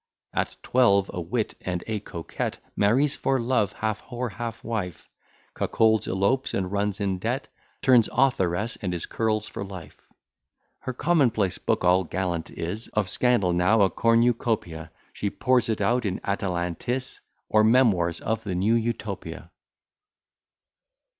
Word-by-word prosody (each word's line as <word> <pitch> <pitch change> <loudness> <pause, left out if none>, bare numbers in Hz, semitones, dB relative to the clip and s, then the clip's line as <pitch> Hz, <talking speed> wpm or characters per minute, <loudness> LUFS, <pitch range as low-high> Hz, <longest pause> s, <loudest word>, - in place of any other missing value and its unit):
At - - -1
twelve, 100 -6 +3
a 90 - -3
wit 105 +7 -2
and 90 -1 -3
a 110 -2 -2
coquette; 85 -5 -5 0.2
Marries 130 +8 +3
for 135 -1 0
love, 115 -4 +1
half 110 -1 -2
whore, 125 -2 -4
half 115 +1 -6
wife; 100 -7 -4 0.5
Cuckolds, 110 -2 +2
elopes, 100 +8 0
and 95 -1 -2
runs 100 0 -1
in 95 -2 -1
debt; 120 +7 -2 0.3
Turns 125 -4 +5
authoress, 110 -5 +1
and 90 -3 -2
is 85 - -4
Curll's 110 -2 -1
for - - -6
life. 95 -6 -10 0.8
Her 130 - -5
common 150 -1 +3
place 100 -5 -1
book - - 0
all 90 +1 +4
gallant 85 -1 -3
is, 95 +7 -4
Of 105 -3 0
scandal 120 -8 +2
now 95 +5 +4
a 95 - +3
cornucopia; 115 -8 +1 0.2
She 100 - -2
pours 125 +1 +1
it 110 -2 -1
out 120 +5 +2
in 95 -3 -2
Atalantis 100 +6 -2 0.3
Or 110 0 +4
memoirs 105 -8 +3
of 110 0 -2
the 95 -4 -3
New 100 +5 +2
Utopia. 115 0 -3
105 Hz, 145 wpm, -25 LUFS, 95-115 Hz, 0.8 s, Turns